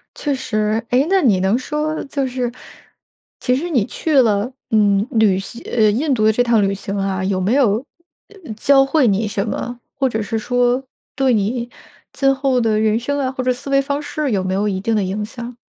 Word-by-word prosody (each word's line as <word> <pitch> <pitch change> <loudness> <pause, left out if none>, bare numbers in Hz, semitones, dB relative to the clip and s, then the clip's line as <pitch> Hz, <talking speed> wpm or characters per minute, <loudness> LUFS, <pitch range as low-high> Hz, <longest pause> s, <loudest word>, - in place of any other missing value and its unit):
确 290 - -2
实， 215 -3 -1
诶， 255 +4 +3
那 385 0 +3
你 215 - +3
能 190 +5 +2
说 300 +4 -3
就 275 -1 -2
是， 250 -1 -2 0.9
其 250 - +1
实 325 +7 -3
你 250 -11 +1
去 295 +3 +1
了， 215 0 +1 0.2
嗯， 205 -1 +3
旅 215 -5 +3
行 230 +5 -9
呃， 220 -3 +4
印 275 +7 0
度 215 -4 +1
的 220 - +5
这 245 +3 +2
趟 235 -3 +3
旅 195 0 +1
行 195 0 -5
啊， 195 -1 -1
有 190 0 0
没 190 +5 +1
有， 245 -7 +3 0.7
呃， 235 - -7
教 270 +5 +4
会 275 -1 +2
你 210 +1 +1
什 200 0 -2
么？ 240 +2 -4 0.2
或 270 -1 +1
者 220 -2 -2
是 220 +2 -3
说 245 +3 +1 0.3
对 265 -2 +2
你 235 +3 -1 0.4
今 270 -1 +2
后 270 -2 +1
的 220 -2 +1
人 220 +1 +2
生 285 +4 -2
啊， 260 -2 -1
或 260 -1 -4
者 255 0 +2
思 250 +3 -9
维 275 0 +3
方 280 +1 -2
式 300 -1 -3
有 195 -3 0
没 185 0 -2
有 200 +2 0
一 190 -2 -1
定 225 +3 0
的 210 - +1
影 195 +3 -3
响？ 235 +2 -8
235 Hz, 235 characters per minute, -19 LUFS, 210-270 Hz, 0.9 s, 的